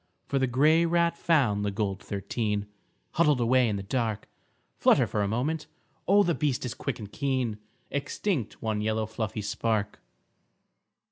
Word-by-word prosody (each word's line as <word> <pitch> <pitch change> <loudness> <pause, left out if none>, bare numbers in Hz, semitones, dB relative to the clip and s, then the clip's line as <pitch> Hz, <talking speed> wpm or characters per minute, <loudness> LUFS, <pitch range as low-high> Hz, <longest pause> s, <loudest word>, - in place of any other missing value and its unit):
For 135 - 0
the 130 - +2
grey 150 +7 +4
rat 170 0 +2
found 130 -13 +2
the 105 - 0
gold 100 -1 -2
thirteen 105 +1 -2 0.5
Huddled 150 -5 +3
away 120 0 +3
in 105 - -1
the 100 - -4
dark, 110 0 -2 0.5
Flutter - - +5
for 105 - -2
a 100 - +1
moment, 140 +9 -1 0.4
oh 200 +3 +6
the 170 - +1
beast 140 -4 -1
is 125 - -3
quick - - -4
and 105 -3 -9
keen, 130 -6 -1 0.3
Extinct 140 - -2
one 110 -1 -1
yellow 110 +1 0
fluffy 110 -1 -4
spark. 110 0 -1
115 Hz, 155 wpm, -28 LUFS, 105-145 Hz, 0.5 s, oh